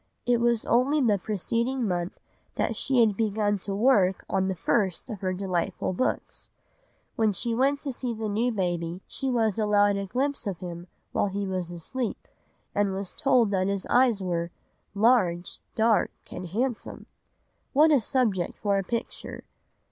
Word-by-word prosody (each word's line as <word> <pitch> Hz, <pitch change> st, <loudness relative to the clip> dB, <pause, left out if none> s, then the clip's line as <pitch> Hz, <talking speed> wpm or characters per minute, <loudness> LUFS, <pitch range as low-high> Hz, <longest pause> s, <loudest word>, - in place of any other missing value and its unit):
It 245 Hz, -1 st, +3 dB
was 235 Hz, -2 st, +2 dB
only 260 Hz, +6 st, +3 dB
the 215 Hz, -7 st, +3 dB
preceding 230 Hz, +6 st, -1 dB
month 175 Hz, -1 st, -2 dB, 0.4 s
that -, -, 0 dB
she 260 Hz, -3 st, +2 dB
had 215 Hz, -3 st, +3 dB
begun 205 Hz, -1 st, 0 dB
to 195 Hz, +1 st, -4 dB
work 200 Hz, -5 st, +3 dB
on 190 Hz, -1 st, 0 dB
the 190 Hz, -, -1 dB
first 190 Hz, +5 st, 0 dB
of 210 Hz, -, -7 dB
her 185 Hz, -1 st, 0 dB
delightful 185 Hz, -1 st, -2 dB
books. 220 Hz, -, -2 dB, 0.7 s
When 220 Hz, -2 st, +2 dB
she 235 Hz, +4 st, -1 dB
went 275 Hz, +4 st, +2 dB
to 280 Hz, -, -3 dB
see 245 Hz, 0 st, -3 dB
the 220 Hz, -1 st, -3 dB
new 225 Hz, +4 st, +1 dB
baby 175 Hz, -3 st, -2 dB
she 270 Hz, -, -3 dB
was 225 Hz, -4 st, +1 dB
allowed 205 Hz, -1 st, +3 dB
a 200 Hz, 0 st, -3 dB
glimpse 270 Hz, +2 st, -1 dB
of 195 Hz, -3 st, -2 dB
him 175 Hz, 0 st, -7 dB, 0.2 s
while -, -, +1 dB
he 200 Hz, +1 st, -3 dB
was 185 Hz, -2 st, -3 dB
asleep, 220 Hz, +8 st, -4 dB, 0.5 s
and 200 Hz, -1 st, +1 dB
was 190 Hz, -1 st, -4 dB
told 250 Hz, -6 st, +3 dB
that 190 Hz, -1 st, +1 dB
his 200 Hz, -1 st, -1 dB
eyes 240 Hz, -6 st, +4 dB
were 170 Hz, -2 st, -1 dB, 0.5 s
"large, 200 Hz, -6 st, +2 dB, 0.2 s
dark, 225 Hz, 0 st, +3 dB, 0.2 s
and 180 Hz, -, -6 dB
handsome." 235 Hz, +6 st, -3 dB, 0.7 s
What 305 Hz, +3 st, +6 dB
a 290 Hz, -, +6 dB
subject 220 Hz, -7 st, 0 dB
for 200 Hz, -2 st, +1 dB
a -, -, -2 dB
picture! 230 Hz, +4 st, -5 dB
205 Hz, 165 wpm, -27 LUFS, 190-240 Hz, 0.7 s, What